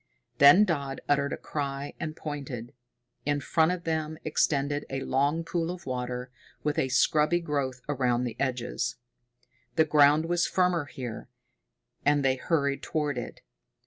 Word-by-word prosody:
Then 145 +9 +8
Dodd 140 -7 -2
uttered 140 -1 +2
a - - -2
cry, 140 -1 -4
and 155 -1 -4
pointed. 135 -7 -6 0.5
In 145 0 0
front 160 +4 +2
of 180 -1 -3
them 160 -1 -2
extended 145 -1 +1
a 135 0 -3
long 145 +6 +1
pool 165 0 -2
of 180 0 -6
water, 125 0 -4 0.3
with 150 -1 0
a 130 - +1
scrubby 150 +6 +3
growth 140 -6 -2
around 125 -4 +1
the 120 -3 -3
edges. 125 -1 -2 0.8
The 160 - +4
ground 150 +1 +5
was 175 +1 +1
firmer 180 -4 +1
here, 125 -5 -7 0.7
and 145 -1 +3
they 130 -1 +3
hurried 140 -1 0
toward 150 -5 -1
it. 120 - -8
145 Hz, 145 wpm, -28 LUFS, 135-160 Hz, 0.8 s, Then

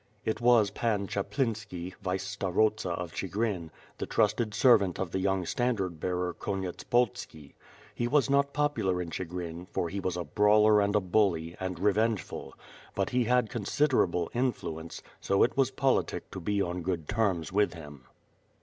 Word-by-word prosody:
It 110 - -1
was 120 -4 +5
Pan 105 -2 0
Chaplinski, 100 -4 -3
vice 95 0 -2
starosta 100 +1 +1
of 85 -1 -4
Ohigrin, 95 -3 -2 0.3
the - - -3
trusted 110 +1 +1
servant 110 -7 +4
of 95 -3 -2
the 95 - -1
young 95 -1 0
standard 95 -8 -1
bearer 90 0 -1
Konyetspolski. 95 - -2 0.4
He 120 - -1
was 140 +2 +3
not 140 0 +2
popular 145 -12 0
in 85 -2 -4
Chigrin, 90 -1 -5
for 85 - -2
he 100 - -4
was 95 -2 -2
a 90 - -2
brawler 105 +2 +4
and 100 +1 +1
a - - +5
bully, 90 -4 +1
and 95 -1 -3
revengeful, 105 +3 0 0.4
but - - -1
he 125 -1 +2
had 125 -1 +2
considerable 105 - +1
influence, 85 -10 -3 0.2
so 100 - +2
it - - +1
was 135 -2 +3
politic 135 0 0
to - - -6
be 100 +3 0
on 90 0 -3
good 85 -3 -3
terms 95 -6 0
with 105 -2 +2
him. 75 -5 -11
100 Hz, 160 wpm, -29 LUFS, 90-115 Hz, 0.4 s, was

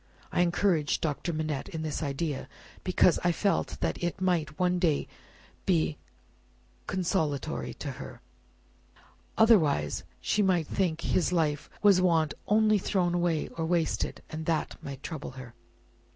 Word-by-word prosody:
I - - +2
encouraged 175 -3 +2
Doctor 155 +2 -1
Manette 155 -3 -3
in 160 -1 -5
this 155 0 -3
idea, 145 0 -3 0.3
because 180 -1 +4
I 175 - +4
felt 195 +4 0
that - - -1
it 175 +2 -1
might 165 -5 0
one 180 0 +2
day 160 -5 +1 0.6
be 160 -5 +2 0.9
consolatory 165 -6 -1
to - - -5
her. - - -9 1.2
Otherwise, 160 - +4 0.2
she 210 - +1
might 180 -5 +2
think 165 -1 -1
'his 180 - +1
life 150 -4 0
was 200 -3 +6
wantonly 190 +6 +2
thrown 180 -2 0
away 175 -3 0
or 165 - -4
wasted,' 165 0 0
and 155 0 -5
that 165 -2 0
might 140 0 -7
trouble 150 -5 -6
her." 125 -2 -9
165 Hz, 135 wpm, -29 LUFS, 155-180 Hz, 1.2 s, was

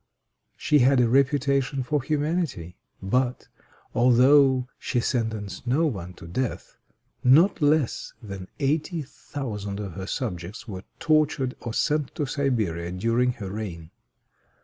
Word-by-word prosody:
She 150 - +3
had 130 +1 +5
a 120 - +4
reputation 140 +1 +2
for 145 +3 0
humanity; 150 - -2 0.3
but, 125 +5 0 0.5
although 130 +2 +5
she 125 - -1
sentenced 110 -4 -2
no 145 +7 +3
one 95 - -3
to - - -12
death, 115 +9 -4 0.5
not 155 +9 +5
less 145 -3 +1
than 100 -5 -8
eighty 155 +3 0
thousand 105 -8 -6
of 100 -4 -5
her 95 +2 -6
subjects 100 -4 -4
were 95 -3 -7
tortured 150 -4 +1
or 115 -2 -5
sent 150 -2 0
to 150 - -1
Siberia 110 - -1
during 115 +7 +1
her 100 -5 -7
reign. 90 -6 -6
125 Hz, 125 wpm, -25 LUFS, 100-140 Hz, 0.5 s, had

